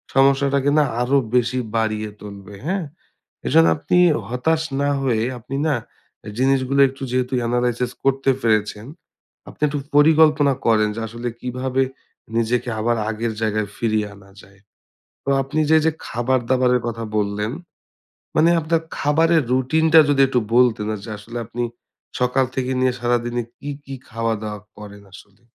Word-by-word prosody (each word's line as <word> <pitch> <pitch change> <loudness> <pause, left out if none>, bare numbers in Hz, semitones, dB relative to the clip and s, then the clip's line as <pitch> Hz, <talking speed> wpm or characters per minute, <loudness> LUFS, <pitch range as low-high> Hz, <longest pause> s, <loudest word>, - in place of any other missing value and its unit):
সমস্যাটাকে 140 +1 +3
না - - +5 0.2
আরো 130 +3 +2 0.2
বেশি 125 +1 +2 0.2
বাড়িয়ে 110 -1 -1
তুলবে, 100 0 -10
হ্যাঁ? 190 -2 -1 0.6
এজন্য 80 - +5
আপনি 80 - 0 0.3
হতাশ 155 +6 0 0.2
না 145 - +1
হয়ে 120 -5 +1 0.2
আপনি 130 +4 -7
না 150 - +2 0.5
আ - - -6
জিনিসগুলো 135 +1 +2
একটু 135 +1 -10
যেহেতু 125 0 -1 0.2
analysis 120 0 0
করতে 135 0 +1
পেরেছেন, 110 -1 0 0.6
আপনি - - -16
একটু 145 0 -2 0.2
পরিকল্পনা 150 -1 +5
করেন 110 -2 +3
যে 115 - -4
আসলে 120 +2 -6
কিভাবে 130 +1 -1 0.5
নিজেকে 120 +2 0
আবার 120 +1 +1
আগের 115 +1 -2
জায়গায় 110 -1 0
ফিরিয়ে 110 -2 0
আনা 100 0 -18
যায়? 100 0 -20 0.7
তো - - -8
আপনি 150 +4 -2
যে, 160 - +7
যে - - +4 0.2
খাবার-দাবারের 125 +1 +1
কথা 115 -1 -4
বললেন। 105 +1 -1 0.9
মানে 165 +2 +5
আপনার 160 +1 0 0.2
খাবারের 160 +2 +3
রুটিনটা 160 +5 +4
যদি 145 -1 +2
একটু 125 -2 +1
বলতেন? 120 -4 +3
আর 105 - -6
যে 110 - -8
আসলে 115 +3 -8
আপনি 120 +2 -4 0.6
সকাল 125 +1 +2
থেকে 130 -1 -2
নিয়ে 130 -1 +2
সারাদিনে 120 0 0 0.2
কি, 145 - -8 0.2
কি 135 - -7
খাওয়া 115 0 -1
দাওয়া 105 -1 -5 0.2
করেন 105 -1 -11
আসলে? 100 +3 -16
125 Hz, 150 wpm, -21 LUFS, 110-135 Hz, 0.9 s, যে